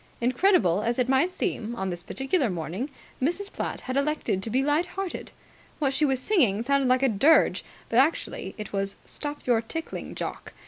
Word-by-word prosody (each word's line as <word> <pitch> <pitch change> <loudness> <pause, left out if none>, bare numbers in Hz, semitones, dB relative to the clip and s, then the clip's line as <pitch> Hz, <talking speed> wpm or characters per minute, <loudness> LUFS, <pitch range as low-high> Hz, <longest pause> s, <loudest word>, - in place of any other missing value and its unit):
Incredible 240 - +3
as 235 +2 0
it 250 -1 +2
might 270 +7 +3
seem, 240 - -2
on 190 -4 -2
this 175 0 -5
particular 270 - 0
morning 180 - -3 0.3
Mrs. 350 +9 -1
Platt - - -3
had 255 - -4
elected 280 -9 0
to 225 - -4
be 260 +4 +2
light 300 +5 +2
hearted. 385 -1 -5 0.5
What 275 -3 +1
she 300 +3 +3
was 265 -3 +1
singing 255 - +2
sounded 275 0 +2
like 255 +1 +3
a - - +6
dirge, 265 +8 +4 0.2
but 230 - +3
actually 295 +5 0
it 210 -2 -7
was 195 0 -1
"Stop 295 0 -6
your 235 -3 +3
tickling, 325 +8 -6
Jock!" - - -5
260 Hz, 185 wpm, -26 LUFS, 225-300 Hz, 0.5 s, a